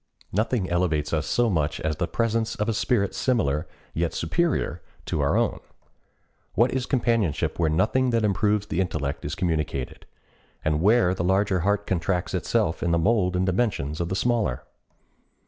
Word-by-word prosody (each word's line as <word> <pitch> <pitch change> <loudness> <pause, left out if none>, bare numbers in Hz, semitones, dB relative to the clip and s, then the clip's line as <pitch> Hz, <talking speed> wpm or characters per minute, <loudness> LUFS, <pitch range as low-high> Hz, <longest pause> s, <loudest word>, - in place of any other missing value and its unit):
Nothing 110 0 0
elevates 85 -4 0
us 80 -1 0
so 120 0 +2
much 80 -8 0
as 75 -1 -1
the 85 - -1
presence 115 -1 0
of 105 - -2
a 115 - +1
spirit 105 -2 +1
similar, 85 - 0 0.3
yet 85 0 -1
superior, 130 - 0 0.2
to - - -1
our - - +2
own. - - 0 1.0
What 120 +3 +3
is 130 -1 -1
companionship 115 - 0
where 80 -2 +2
nothing 110 +11 +2
that 115 -2 +2
improves 105 +1 +1
the 95 -3 -1
intellect 75 -6 -3
is 75 - -3
communicated, 80 -8 -2 0.6
and 75 0 +1
where 105 -1 +4
the 90 - -3
larger 95 +1 +2
heart 100 +3 0
contracts 90 0 -1
itself 80 - 0
to - - -2
the 85 0 +2
mold 90 0 +2
and 90 +1 +1
dimensions 90 - -1
of 85 - -2
the 95 - -1
smaller? 110 - 0
95 Hz, 165 wpm, -25 LUFS, 80-110 Hz, 1.0 s, where